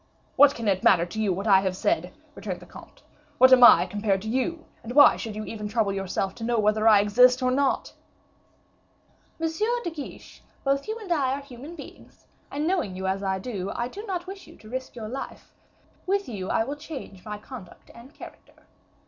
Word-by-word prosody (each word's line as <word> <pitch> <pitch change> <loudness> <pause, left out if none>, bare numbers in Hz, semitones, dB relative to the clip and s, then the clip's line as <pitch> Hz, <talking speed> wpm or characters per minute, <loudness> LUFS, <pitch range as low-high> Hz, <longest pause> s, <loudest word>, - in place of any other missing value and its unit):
"What 285 0 +6
can 230 -2 -4
it 190 -2 +1
matter 175 -3 +4
to 215 +5 -5
you 205 -3 +1
what 195 +3 -3
I 195 -2 +4
said?" 190 - -1 0.2
returned - - -6
the - - -14
comte. - - -15 0.3
"What 260 +1 +7
am 250 -1 +7
I 240 - +8
compared 200 0 -1
to 220 - -5
you, 290 +7 -2 0.2
and 245 +2 -8
why 285 - +8
should 220 -2 -6
you 215 0 -5
even 210 -2 -6
trouble 210 -2 0
yourself 195 0 -2
to 225 - -8
know 235 +1 0
whether 215 +1 +2
I 210 -2 +7
exist 250 +5 +4
or 255 - +2
not?" 275 +1 0 1.5
"Monsieur 325 +7 -1
de 345 - -3
Guiche, 300 -3 -10 0.2
both 275 +3 0
you 435 +1 -3
and 420 -6 -9
I 270 -5 0
are 280 - -4
human 280 +4 -11
beings, 295 - -14 0.2
and, 295 +2 -3
knowing 330 - -1
you 190 +1 -5
as 190 +1 -1
I 190 -1 -1
do, 195 -2 -5
I 240 - -2
do 405 +11 -9
not 360 -3 -3
wish 385 +1 -10
you - - -15
to 215 - -15
risk 260 0 -5
your 225 -3 -6
life; 265 +5 -8 0.5
with 400 +1 0
you 195 -6 -5
I - - +1
will 280 +5 -5
change 285 - -9
my 210 -1 -6
conduct 210 -4 -12
and 240 +4 -14
character. - - -14
240 Hz, 210 wpm, -25 LUFS, 205-280 Hz, 1.5 s, I